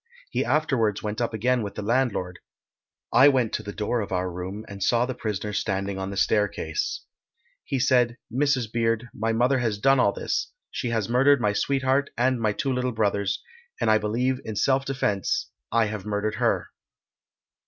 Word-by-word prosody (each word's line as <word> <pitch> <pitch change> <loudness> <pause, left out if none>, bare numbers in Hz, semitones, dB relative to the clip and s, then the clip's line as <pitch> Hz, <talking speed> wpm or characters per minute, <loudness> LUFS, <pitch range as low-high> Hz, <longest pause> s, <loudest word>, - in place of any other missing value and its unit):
He - - 0
afterwards 125 -9 +1
went 105 +2 -3
up 120 - 0
again 120 +3 +1
with 100 -2 -5
the 105 - -4
landlord. 110 -6 0 0.7
I 135 - +8
went 130 -6 +2
to - - -1
the 100 -1 -6
door 105 +3 -1
of 100 - -6
our 90 0 -1
room 95 +5 -6
and 100 -1 -9
saw 120 +5 +3
the 130 - -3
prisoner 105 -3 -3
standing 100 -1 -2
on 95 0 -3
the 100 - -6
staircase. 105 - 0 0.6
He 135 - -1
said, 125 -2 +3 0.2
Mrs. 135 -2 +2
Beard, 115 0 0
my 115 +1 -1
mother 125 +4 +2
has 115 -4 0
done 135 +4 +4
all 100 - +4
this. 415 - -2 0.2
She 125 - -3
has 110 -4 0
murdered 135 +3 +4
my 105 -3 +1
sweetheart 135 +4 +1
and 125 0 +2
my 110 -1 +2
two 135 +6 -1
little 125 0 0
brothers, 100 -2 0 0.4
and - - +2
I 110 - +5
believe 125 +5 0
in 110 - -5
self 135 +5 +2
defence 105 -8 -1 0.2
I 115 -1 +3
have 105 -2 -4
murdered 105 0 -2
her." - - 0
115 Hz, 185 wpm, -25 LUFS, 105-130 Hz, 0.7 s, I